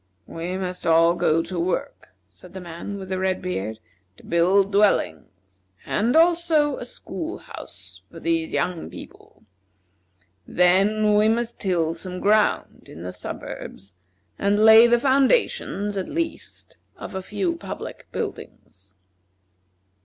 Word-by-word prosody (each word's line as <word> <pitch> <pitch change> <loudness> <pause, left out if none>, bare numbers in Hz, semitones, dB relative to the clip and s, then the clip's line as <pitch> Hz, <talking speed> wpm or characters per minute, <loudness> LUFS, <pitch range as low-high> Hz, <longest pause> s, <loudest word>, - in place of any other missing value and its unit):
"We 175 +3 -5
must 180 -2 -4
all 165 +1 +5
go 165 -1 +2
to 175 +1 -5
work," 170 - -3
said 95 - -17
the - - -5
man 175 +3 -7
with 190 -1 -8
the 185 -1 -2
red 190 0 0
beard, 110 - -4 0.4
"to - - -18
build 190 +4 +3
dwellings, 95 - 0 0.2
and 230 +6 0
also 330 -3 +3
a - - -6
school 330 +1 -6
house - - -10
for - - -11
these 330 -2 -1
young 175 -2 -2
people. - - -13 1.0
Then 200 +4 +3
we 210 +1 +4
must 235 +1 -1
till 170 -4 0
some 180 +2 -6
ground 210 +2 +1
in 80 - -10
the 90 0 -6
suburbs, 90 +1 -8 0.5
and 205 +2 +3
lay 220 +1 +9
the 240 0 +4
foundations, 260 - +1
at 190 - -3
least, 330 0 -5 0.2
of - - -8
a 190 - -3
few 340 - -2
public - - -8
buildings." 95 0 -8
190 Hz, 135 wpm, -23 LUFS, 170-225 Hz, 1.0 s, lay